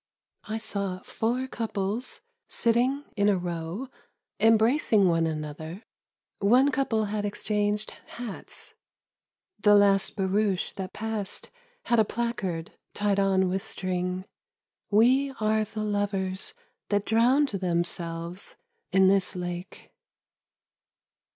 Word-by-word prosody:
I 220 0 -3
saw 200 -4 -2
four 245 +4 -1
couples 225 -1 -3 0.3
sitting 250 +5 +1
in 205 0 +3
a 200 - +3
row.... 175 +7 -4 0.5
embracing 225 -2 +4
one 165 -1 +2
another.... 155 +5 -5 0.6
One 250 +8 +5
couple 225 -6 +1
had 210 0 -2
exchanged 210 +1 -1 0.2
hats.... 235 -4 -8 0.9
The 210 -1 +6
last 200 -1 +4
barouche 195 -1 0
that 190 -1 -6
passed 215 -2 -5 0.3
had 235 -1 +2
a - - +7
placard 205 -8 -3 0.2
tied 205 -1 +1
on 190 -1 +3
with 190 +1 -1
string 180 0 -3 0.2
— - - -66
" - - -58
We 265 +4 +4
are 215 0 +2
the 215 0 -5
lovers 205 - -2 0.3
that 205 0 +1
drowned 250 +6 +4
them 180 -5 0
selves 170 +1 -5 0.4
in 190 0 +5
this 195 -1 +3
lake." 175 0 -6
205 Hz, 115 wpm, -27 LUFS, 185-225 Hz, 0.9 s, a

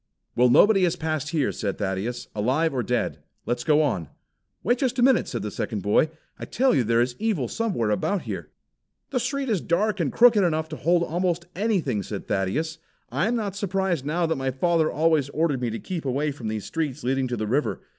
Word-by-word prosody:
"Well, 125 +1 +4
nobody 205 - +6
has 175 0 0
passed 155 -3 -2
here," 150 -4 0
said 100 -4 -3
Thaddeus, 105 +5 -3
"alive 135 +10 +1
or 130 - 0
dead. 120 0 -1 0.3
Let's 120 0 -1
go 150 +2 +4
on!" 95 - -1 0.6
"Wait 240 +6 +2
just 255 -2 0
a 245 - +3
minute," 260 -1 +4
said 120 - -4
the 105 - -4
second 105 -2 -3
boy. 105 +9 +3 0.3
"I - - -5
tell 260 +2 +2
you 130 - +3
there 115 +1 +2
is 120 0 -4
evil 205 - 0
somewhere 185 - -1
about 190 - 0
here!" - - -6 0.6
"The 255 - +1
street 275 +2 -2
is 210 -8 0
dark 205 +4 0
and 155 -6 0
crooked 230 -4 +5
enough 160 -2 0
to 155 - -5
hold 170 +2 +2
almost 175 0 -1
anything," 180 - 0
said - - -6
Thaddeus. 155 - -1 0.3
"I 195 - +1
am 240 - +1
not 205 -4 -2
surprised 190 -6 -1
now 165 +4 0
that 160 -2 -1
my 135 - 0
father 160 +4 +1
always 155 -3 +2
ordered 145 -3 0
me 120 - 0
to 115 - -4
keep 175 +4 -5
away 140 +3 0
from 130 -5 -7
these 110 -1 -3
streets 150 -4 -3
leading 130 +1 0
to 120 -1 -3
the 110 - -2
river. 135 +8 0
155 Hz, 215 wpm, -25 LUFS, 125-185 Hz, 0.6 s, nobody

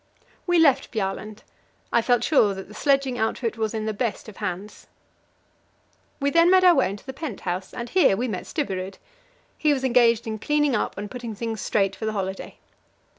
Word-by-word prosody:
We 350 0 +3
left 305 -6 +4
Bjaaland. 210 0 -4 0.5
I 235 - +4
felt 245 0 +2
sure 215 -10 +3
that 190 - -8
the 210 - -13
sledging 275 +1 +1
outfit 225 +1 -1
was 220 -1 -2
in 215 -1 -2
the 220 - -1
best 225 +1 -3
of 215 - -11
hands. 190 +4 -6 1.3
We 280 0 +1
then 335 +2 +5
made 375 0 +5
our 360 -1 +8
way 270 - +2
into 200 +1 -8
the 265 - -6
pent 275 -6 -6
house, 185 +1 -4
and 240 -1 -6
here 285 - +3
we 250 +4 -1
met 185 -6 -4
Stubberud. 190 - -3 0.6
He 300 -1 +3
was 265 -2 -3
engaged 235 -3 +3
in 220 -1 -4
cleaning 295 +1 +1
up 210 - -2
and 205 +1 -6
putting 240 -3 -6
things 225 0 -4
straight 195 -2 0
for 220 - -4
the 220 - -1
holiday. 190 -1 -4
230 Hz, 195 wpm, -24 LUFS, 205-275 Hz, 1.3 s, our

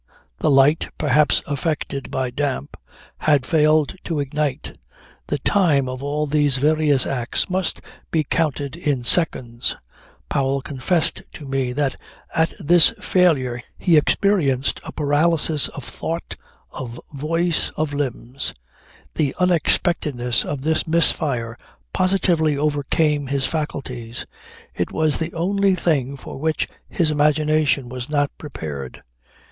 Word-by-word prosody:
The - - +1
light 140 +3 +4
(perhaps 150 0 +2
affected 145 -2 -3
by 130 -1 -2
damp) 135 - -3 0.4
had 145 -4 +2
failed 155 -1 +2
to 165 -4 -2
ignite. 145 -1 -3 0.5
The 145 - -1
time 145 -4 +2
of 130 0 -5
all 145 +2 -1
these 145 -2 +2
various 150 -1 +2
acts 125 - -2
must 185 -2 +1 0.3
be 160 -2 +1
counted 145 -2 -1
in 145 -7 -1
seconds. 120 -5 +4 0.5
Powell 135 0 0
confessed 155 +5 0
to 150 - -9
me 135 -2 -1
that 135 -1 -1 0.4
at 160 0 +1
this 175 +5 +6
failure 145 -12 +1 0.2
he 175 -3 +3
experienced 150 -5 +2
a - - -7
paralysis 150 +1 +2
of 140 - -8
thought, 165 +7 -5 0.4
of 120 -2 -7
voice, 165 +4 0
of 155 -1 -1
limbs. 135 -1 -4 0.6
The 145 -3 -1
unexpectedness 150 - +1
of 145 -2 -5
this 160 +1 0
misfire 140 -8 +1 0.4
positively 175 -5 +2
overcame 145 0 0
his 135 0 0
faculties. 125 -7 -4 0.5
It 90 - -3
was 155 -2 +1
the 165 +1 -3
only 195 +3 +1
thing 140 -6 0
for 135 - -9
which 160 +1 -1 0.2
his 165 -4 0
imagination 150 -2 +2
was 125 +1 -6
not 145 -1 0
prepared. 75 - -7
145 Hz, 125 wpm, -21 LUFS, 135-160 Hz, 0.6 s, this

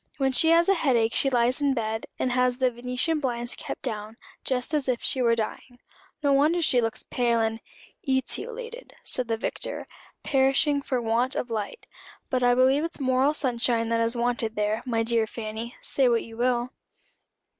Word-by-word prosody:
"When 270 -2 +1
she 320 +5 +4
has 335 +1 +5
a 390 - +5
head 295 -8 +2
ache 225 0 +2
she 270 - +3
lies 250 +2 +2
in 280 -2 +2
bed, 220 -1 -2
and 255 - 0
has 250 0 +2
the 255 -1 +2
venetian 250 +6 -1
blinds 240 -3 -2
kept - - -7
down, 215 +1 -4 0.3
just 255 +3 -2
as 295 -3 0
if 250 -2 -1
she 260 - 0
were 230 -1 +4
dying. 230 +2 -5 0.5
No 285 -1 +4
wonder 300 +5 +3
she 265 -7 +3
looks 225 -1 -2
pale 235 -2 +1
and 225 0 0 0.3
" 365 - -31
"Etiolated," 475 - -3
said 250 -2 -1
the 225 -1 0
Vicar; - - -5 0.4
"perishing 275 +1 +2
for 260 -2 -1
want 235 +3 0
of 240 - -3
light. 215 - -4 0.5
But 255 -1 +1
I 245 0 +4
believe 260 +4 +4
it's 335 -1 -5
moral 265 +2 +2
sunshine 235 -4 0
that 230 0 +1
is 230 +1 +1
wanted 235 -2 0
there, 210 +2 0
my 230 -2 +1
dear 225 -1 +1
Fanny, 225 +2 -6
say 265 -3 +2
what 235 -1 +2
you 225 - -11
will." 245 +1 0
245 Hz, 190 wpm, -26 LUFS, 230-270 Hz, 0.5 s, has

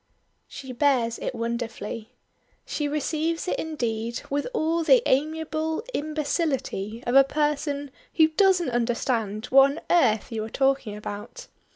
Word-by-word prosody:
She 265 -1 -8
bears 245 -3 +1
it 260 - -4
wonderfully. 230 -1 -4 0.6
She 295 - -2
receives 315 +3 -1
it - - -1
indeed 235 -7 -3
with 285 +1 0
all 330 -7 0
the 480 +8 +5
amiable 315 +4 0
imbecility 290 - -2
of 240 - -1
a 275 0 +8
person 290 0 -1 0.2
who 315 -1 +5
doesn't 360 -3 +3
understand 230 -3 -1
what 270 +1 +7
on 325 - -8
earth 245 - +3
you 220 -1 -2
are 220 - -6
talking 270 -4 0
about. 210 - -7
275 Hz, 135 wpm, -25 LUFS, 235-315 Hz, 0.6 s, a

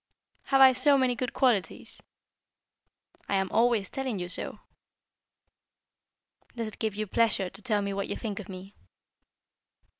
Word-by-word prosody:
"Have 270 0 +3
I 260 -1 +9
so 275 +3 +4
many 260 -2 +2
good 250 0 -3
qualities?" 235 -8 0 1.3
"I 200 - +1
am 190 -1 0
always 230 -4 +2
telling 265 -5 -3
you 180 -1 -5
so." - - -2 2.0
"Does 230 -2 -3
it - - -12
give 220 -3 -2
you 215 +1 -2
pleasure 210 -3 +1
to 195 - -10
tell 210 -4 0
me 200 0 -2
what 200 0 -3
you - - -3
think 215 -4 -5
of 210 - -9
me?" 190 +1 -9
215 Hz, 150 wpm, -28 LUFS, 195-250 Hz, 2.0 s, I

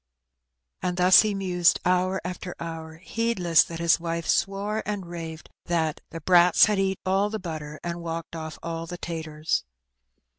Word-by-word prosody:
And 180 0 -2
thus 180 +1 +7
he 215 -2 -1
mused 180 -3 +2
hour 185 +1 +2
after 180 0 -5
hour, 160 -1 -6
heedless 185 -3 +2
that 165 - -7
his 170 0 +3
wifa 165 -1 -3
swore 205 +2 0
and 205 -3 -4
raved 165 -2 -7 0.2
that 160 -3 -1
"the 165 - -7
brats 175 +1 +6
had 210 -2 0
eat 190 -1 0
all 195 +2 +2
the 220 - -3
butter, 155 -5 -6
and. 170 0 -4
walked 165 -1 -5
ofiF 160 -1 -6
all 165 0 -4
the 175 - -6
taturs." 160 - -3
175 Hz, 160 wpm, -26 LUFS, 165-190 Hz, 0.2 s, thus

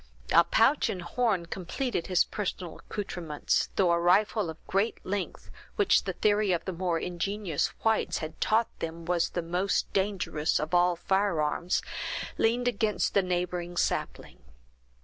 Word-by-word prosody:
A 170 - +7
pouch 265 - +3
and 180 -2 -4
horn 200 -1 0
completed 190 +4 -3
his 185 -2 +4
personal 185 -4 -5
accouterments, 175 -7 -2
though 185 -3 +3
a 170 - +3
rifle 195 +2 +3
of 160 - -7
great 200 +4 0
length, 195 -1 -4 0.2
which 410 -3 +3
the 190 - -2
theory 205 +1 +2
of 175 - -1
the 190 - -2
more 175 -1 -1
ingenious 180 -1 -1 0.2
whites 220 -1 +1
had 155 0 -7
taught 225 +1 +1
them 165 0 -5
was 175 -1 +1
the 175 - -3
most 180 +4 -1
dangerous 190 -6 0
of 155 +2 -4
all 175 0 +4
firearms, 175 -3 0 0.6
leaned 240 +2 +2
against 215 -3 0
a 200 - +6
neighboring 175 -1 -2
sapling. - - -2
180 Hz, 150 wpm, -28 LUFS, 170-205 Hz, 0.6 s, A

